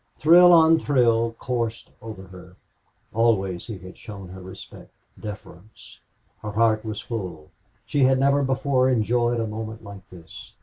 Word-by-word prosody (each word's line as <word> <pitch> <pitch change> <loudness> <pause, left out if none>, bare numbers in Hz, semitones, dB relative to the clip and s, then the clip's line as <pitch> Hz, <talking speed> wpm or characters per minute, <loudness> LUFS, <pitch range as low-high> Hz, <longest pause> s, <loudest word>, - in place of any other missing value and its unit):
Thrill 175 +4 +7
on 165 -1 +6
thrill 115 -5 +1
coursed 115 -2 -4
over 110 -4 -9
her. 90 -1 -14 0.6
Always 100 -6 0
he 110 -4 -6
had 95 +1 -12
showed 100 -4 -10
her 95 0 -10
respect, 95 +1 -12 0.3
deference. 105 -1 -11 0.4
Her 105 -1 -6
heart 110 0 +2
was 110 -2 -5
full. 90 -9 -7 0.3
She 145 - -1
had 130 0 +3
never 140 +2 +2
before 130 -1 +1
enjoyed 120 0 +1
a 115 - -1
moment 110 +1 -7
like 100 -2 -12
this. 85 -3 -13
110 Hz, 145 wpm, -23 LUFS, 95-125 Hz, 0.6 s, Thrill